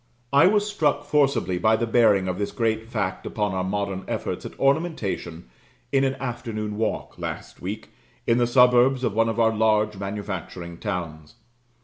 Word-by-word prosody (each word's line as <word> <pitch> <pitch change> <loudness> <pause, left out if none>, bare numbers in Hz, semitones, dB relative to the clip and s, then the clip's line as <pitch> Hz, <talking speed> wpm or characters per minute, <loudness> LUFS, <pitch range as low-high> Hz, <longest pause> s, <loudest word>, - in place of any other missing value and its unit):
I 140 - +7
was 205 +1 +3
struck 150 -8 0
forcibly 140 -10 +1
by 110 +4 +4
the 115 - 0
bearing 110 -5 +3
of 90 +1 -3
this 100 - -2
great 115 -2 -1
fact 105 -5 -2
upon 105 -3 -1
our 95 0 -1
modern 100 0 -2
efforts - - -3
at - - -13
ornamentation 135 - -1 0.4
in 135 -1 +3
an 135 0 +1
afternoon 115 -4 -4
walk, 110 +1 -3
last - - -6
week, 100 +5 -5 0.4
in 115 +1 +3
the 120 - +3
suburbs 125 +1 +5
of 115 - 0
one 115 +1 +2
of 115 +1 -2
our 115 -1 +4
large 105 -1 +2
manufacturing 95 -4 -6
towns. 80 -7 -5
110 Hz, 165 wpm, -24 LUFS, 100-125 Hz, 0.4 s, I